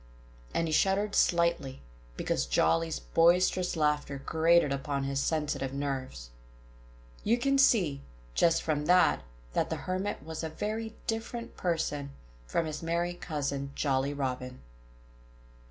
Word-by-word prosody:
And 165 - 0
he - - -2
shuddered 195 +5 +2
slightly, 170 -6 +2 0.4
because 65 - -1
Jolly's 80 +6 +2
boisterous 175 - +3
laughter 150 -2 0
grated 160 -1 +4
upon 140 0 -2
his 135 0 -1
sensitive 145 -4 -1
nerves. 130 - -4 0.9
You 230 +3 +3
can 275 +2 +2
see, 180 - +4 0.3
just 165 - +3
from 150 -2 -1
that, 180 +1 +5 0.3
that - - 0
the - - -1
Hermit 185 -3 -2
was 160 +1 -6
a 160 - -2
very 220 +6 -4
different 230 +1 -4
person 150 -5 -2 0.3
from 165 - 0
his 155 -1 -5
merry 170 +1 -1
cousin, 140 -5 -3
Jolly 135 -1 +1
Robin. 130 -2 -4
155 Hz, 125 wpm, -30 LUFS, 140-180 Hz, 0.9 s, that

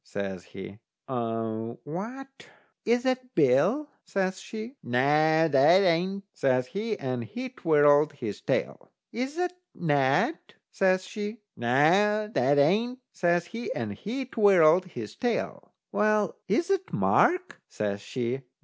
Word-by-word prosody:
says 95 -3 -6
he. 100 +2 -10 0.3
"What, 125 - -5 0.4
is 240 +2 +2
that 255 -1 -2
Bill?" 165 - +3 0.2
says 190 -1 -2
she. 220 +6 -8
"Noo, 150 +6 +3
that 145 +6 +5
ain't," 185 +3 +1
says 130 -1 +1
he, 210 - -3
and 125 -3 -3
he 250 - -6
twirled 150 - +3
his 115 -8 -6
tail. - - -2 0.2
"Is 260 +5 -4
that 360 0 -1 0.2
Ned?" 145 - +1 0.3
says 185 -1 +1
she. 210 +3 -6
"Noo, 185 - +2
that 145 - +2
ain't," 210 - +2 0.2
says 175 -1 +1
he, 230 +7 -6
and 110 -4 -3
he 240 - -5
twirled 185 -7 +4
his 120 - -8
tail. 240 -2 -3 0.2
"Well, 210 -3 +1
is 335 - 0
that 385 -1 -1
Mark?" 365 +1 +2
says 100 -1 -3
she. 125 +4 -3
175 Hz, 125 wpm, -27 LUFS, 130-220 Hz, 0.4 s, that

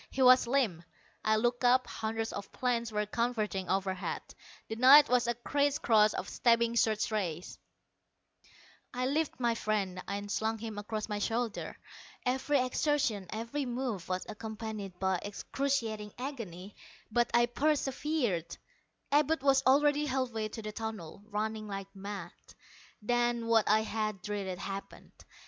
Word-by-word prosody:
He 265 - 0
was 255 -1 +7
limp. 235 -10 +1 0.4
I 215 0 +3
looked 240 +3 0
up. 255 +1 +5
Hundreds 225 0 -3
of 200 - -6
planes 235 -2 -1
were 210 0 0
converging 215 -4 -1
overhead; 190 0 -1 0.4
the 220 - -4
night 265 +5 +8
was 250 -1 +3
a 240 - +1
criss 285 +4 +1
cross 215 -2 +4
of - - -3
stabbing 235 -1 +2
search 220 -1 +2
rays. 180 -5 -3 1.4
I 250 +1 0
lifted 295 +3 -1
my 240 -2 +2
friend 200 -5 -1
and 205 +1 -4
slung 220 +2 0
him 220 -1 -6
across 215 +1 -4
my 210 -1 -3
shoulder. 230 +1 -2 0.5
Every 265 +3 +1
exertion, 255 -7 0
every 235 +6 -3
move, 240 -8 -3
was 185 0 -2
accompanied 215 -3 -6
by 190 -1 +1
excruciating 220 -1 -2
agony, 210 -8 -6 0.4
but 240 +1 +2
I 240 0 +6
persevered. 270 - 0 0.5
Abud 295 0 +3
was 270 -1 +5
already 295 +2 +4
halfway 250 -5 -1
to 225 +1 -7
the 215 - -4
tunnel, 215 -6 -6
running 215 0 -3
like 195 0 -6
mad. 195 -3 -6 0.7
Then, 240 0 +1
what 225 -2 +3
I 215 +1 +5
had 215 -3 -3
dreaded, 200 -3 -3
happened. 195 +1 -7
225 Hz, 140 wpm, -31 LUFS, 205-250 Hz, 1.4 s, night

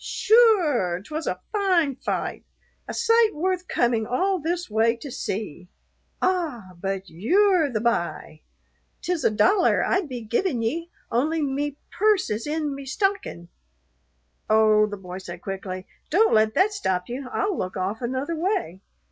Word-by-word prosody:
"Sure, 355 - +3
'twas 310 +7 -5
a - - -2
fine 365 - +2
fight, - - -3 0.4
a - - -5
sight 460 -3 +3
worth 365 +3 -1
coming 235 -3 +1
all 370 +10 +1
this 345 +3 -2
way 225 +2 +2
to 260 +4 -9
see. 185 -6 -5 0.5
Ah! 315 - -1
but 195 0 -3
you're 340 - +3
the 215 -3 -1
b'y. 175 -8 -2 0.6
'Tis 355 -3 -1
a - - +5
dollar 350 - +3
I'd 375 -5 0
be 250 -2 -5
givin' 240 - -1
ye, 330 +9 -2 0.2
only 300 +7 +1
me 285 +1 -2
purse 415 - +2
is 215 +6 -3
in 300 -1 -1
me 275 0 -7
stockin' 270 - -2 0.5
" 60 +1 -44
"Oh," 215 -1 +5
the 205 -1 -6
boy 185 -1 -8
said 190 - -9
quickly, 190 -1 -5 0.2
"don't 430 +7 +4
let 215 0 +3
that 415 +3 +3
stop 185 - -1
you. 250 +2 -6
I'll 405 -2 0
look 185 - -4
off 195 +5 -2
another 260 +7 -2
way." 320 - -2
265 Hz, 155 wpm, -24 LUFS, -, 0.6 s, a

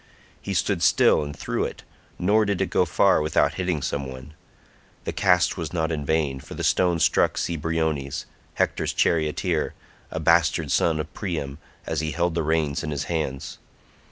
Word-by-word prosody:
He - - -4
stood - - 0
still - - +4
and 75 0 -6
threw - - -2
it, - - -5 0.3
nor 105 +4 +3
did 100 -3 -1
it 95 -3 -1
go 90 - +3
far 80 - +3
without 75 - +2
hitting 90 -6 -2
some 70 -1 -2
one; 65 +3 -10 0.7
the - - -3
cast 90 -2 +3
was 85 -2 -4
not 80 -1 0
in 75 -3 -3
vain, 75 -4 +1
for - - -10
the - - -4
stone 90 -2 +2
struck - - +3
Cebriones, 80 -4 -1 0.3
Hector's - - 0
charioteer, 80 +1 0 0.3
a 80 - -4
bastard 80 -2 +3
son 80 -2 +2
of 75 - -5
Priam, 80 -7 -4 0.3
as 80 - -2
he 80 -1 -2
held 85 0 0
the 85 - 0
reins 80 -2 0
in 80 - -3
his 70 -3 -2
hands. 75 -5 -3
80 Hz, 175 wpm, -24 LUFS, 75-85 Hz, 0.7 s, still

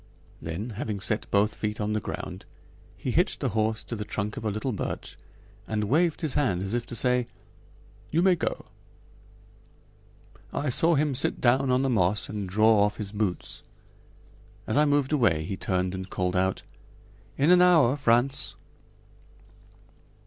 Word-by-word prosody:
Then, 85 +9 -5
having 105 -1 -4
set 105 +3 -2
both 105 +2 +2
feet 105 0 -4
on 105 0 -1
the 110 - +1
ground, - - -6 0.5
he - - -3
hitched - - +1
the - - -1
horse 110 0 -1
to 115 - -6
the 105 - -4
trunk 105 0 -4
of - - -6
a 110 - 0
little 110 +6 -2
birch 105 - -4 0.5
and 105 -1 -1
waved 155 +9 +1
his 155 -5 -1
hand 105 -12 +1
as 100 +2 -4
if 120 0 -2
to - - -6
say: 125 +1 +2 0.8
"You 165 +3 +2
may 185 -1 +5
go." 165 - -3 1.9
I 145 - -2
saw 165 +6 +4
him 150 0 +1
sit 130 - 0
down 130 +2 +3
on 130 +1 +2
the - - +1
moss 100 -2 +1
and 105 -3 -4
draw 110 +2 +4
off 105 0 0
his 105 -3 -5
boots. 105 -4 -3 1.0
As 110 - -1
I 150 - +5
moved 145 -1 +1
away 105 - +2
he 95 - -4
turned 90 -1 -1
and 95 0 -6
called 90 0 -2
out: 95 +1 0 0.7
"In 145 +5 +4
an 180 0 +7
hour, 160 -8 +5
Frantz." 135 0 +1
110 Hz, 165 wpm, -26 LUFS, 100-135 Hz, 1.9 s, an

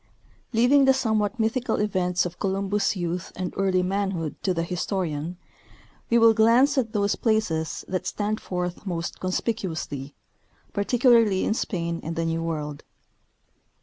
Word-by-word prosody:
Leaving 255 +4 +5
the 265 0 +5
somewhat 220 -3 0
mythical 230 +3 0
events 180 -4 0
of 175 0 -6
Columbus' 195 +1 0
youth 175 -1 -3
and 180 -1 -4
early 185 -1 +2
manhood 190 -4 -2
to 190 - 0
the 165 -2 0
historian, 175 -2 -3 0.7
we 235 - +4
will 230 -1 +7
glance 235 +6 +4
at 245 -5 0
those 200 -1 +1
places 215 -9 0
that 185 -1 -3
stand 210 +1 -2
forth 180 -1 -4
most 170 -2 -3
conspicuously, 170 - -3 0.6
particularly 225 -1 +3
in - - +1
Spain 170 -6 -2
and 165 +1 -5
the 165 -1 -1
New 165 0 -1
World. 150 -3 -4
190 Hz, 140 wpm, -25 LUFS, 170-220 Hz, 0.7 s, will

